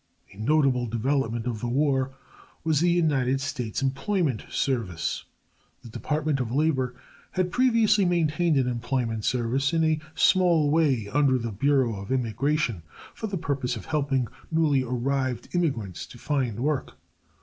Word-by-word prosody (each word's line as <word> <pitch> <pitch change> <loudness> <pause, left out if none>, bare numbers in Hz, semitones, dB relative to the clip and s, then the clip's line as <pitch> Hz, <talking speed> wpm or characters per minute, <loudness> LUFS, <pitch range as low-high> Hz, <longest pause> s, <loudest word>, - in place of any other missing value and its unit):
A - - -17
notable 130 0 +2
development 120 0 -1
of 120 -3 -2
the 120 - -3
war 135 +1 +1 0.5
was 160 -3 +2
the 175 +2 +3
United 140 -7 +2
States 130 -3 -3
Employment 135 - 0
Service. 95 -11 -2 0.6
The 115 - -10
Department 150 +4 -1
of 120 -3 -2
Labor 130 -3 +1 0.4
had 185 -1 0
previously 230 -4 +3
maintained 170 -2 +2
an 130 -2 +2
employment 120 -2 -2
service 130 +4 0
in 165 -1 +2
a 155 -1 +2 0.2
small 180 -4 +4
way 140 -9 +2
under 135 +3 +3
the 115 -2 -3
Bureau 125 0 +1
of 100 - -8
Immigration 125 - 0 0.3
for 220 - -5
the 200 -2 -3
purpose 140 -5 -2
of - - -8
helping 140 -5 0 0.2
newly 155 -4 +2
arrived 130 +1 -2
immigrants 120 - -1
to - - -13
find 130 -5 -1
work. 145 0 -2
135 Hz, 145 wpm, -26 LUFS, 120-155 Hz, 0.6 s, small